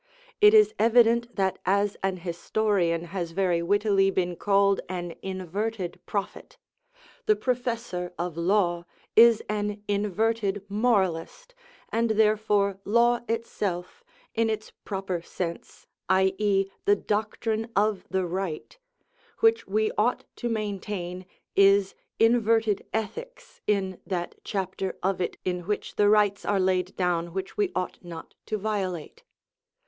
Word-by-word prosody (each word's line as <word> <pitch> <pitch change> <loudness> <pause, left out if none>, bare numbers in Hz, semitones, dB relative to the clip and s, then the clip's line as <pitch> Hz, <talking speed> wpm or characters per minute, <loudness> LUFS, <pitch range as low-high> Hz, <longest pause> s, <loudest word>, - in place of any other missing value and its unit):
It 420 +1 +7
is 425 0 +6
evident 235 0 +4
that 190 -2 0
as 200 +1 +1
an 190 -1 -1
historian 175 0 0
has 170 -4 -3
very 180 -2 +1
wittily 200 +1 +3
been 180 -2 -1
called 200 +1 +3
an 175 -2 -4
inverted 190 +1 -4
prophet, 200 -2 -4 0.7
the 430 - +5
professor 235 - -2
of 175 -1 -3
law 175 -1 +1 0.3
is 230 -1 +7
an 210 0 -2
inverted 205 0 0
moralist, 210 - 0 0.4
and 230 +1 +1
therefore 210 -2 +2
law 235 +3 +3
itself, 210 - -3 0.3
in 225 0 +1
its 215 0 -3
proper 190 -3 -3
sense, 170 0 -6 0.2
i.e., 195 +1 +3 0.2
the 205 - +5
doctrine 220 +2 -2
of 205 -1 +2
the 190 -1 0
right, 185 - -4 0.6
which 450 0 +3
we 435 0 +1
ought - - +1
to 240 - -2
maintain, 195 -4 -4 0.3
is 195 0 +5 0.2
inverted 225 -2 +3
ethics - - -5
in 190 -3 0
that 175 -3 -3
chapter 190 -1 -3
of 190 0 0
it 180 - -2
in 180 -1 -2
which 210 - -3
the 205 0 +4
rights 205 -1 +3
are 200 -1 +1
laid 185 -1 +1
down 175 -2 -1
which 190 0 -4
we 410 -3 0
ought 185 - -3
not 170 -2 -9
to 215 - -1
violate. 200 - -3
200 Hz, 125 wpm, -26 LUFS, 185-220 Hz, 0.7 s, It